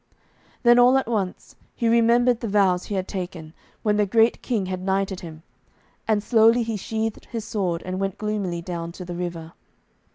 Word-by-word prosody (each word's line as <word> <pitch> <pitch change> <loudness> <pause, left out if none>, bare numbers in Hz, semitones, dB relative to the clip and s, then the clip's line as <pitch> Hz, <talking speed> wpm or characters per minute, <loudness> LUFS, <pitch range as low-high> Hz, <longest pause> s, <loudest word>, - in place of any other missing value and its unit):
Then, 240 0 +6
all 250 +2 +6
at 265 - -1
once, 200 -6 -3 0.2
he 235 - -1
remembered 235 +1 +4
the 235 - -4
vows 195 -3 +2
he 205 - -4
had 185 -1 -2
taken, 175 -5 -6 0.3
when 210 -1 +2
the 210 -1 +2
great 225 +3 +3
King 220 -7 -1
had 185 0 -4
knighted 195 0 -1
him, 160 -2 -10 0.6
and 215 -2 +1
slowly 230 +1 +4
he 225 -1 -3
sheathed 220 +2 -3
his 225 -3 -6
sword, 185 -7 -2
and 185 +1 -3
went 195 -1 -2
gloomily 205 -5 -3
down 170 -1 -5
to 180 - -8
the 175 - -6
river. 170 -2 -5
200 Hz, 185 wpm, -23 LUFS, 180-225 Hz, 0.6 s, Then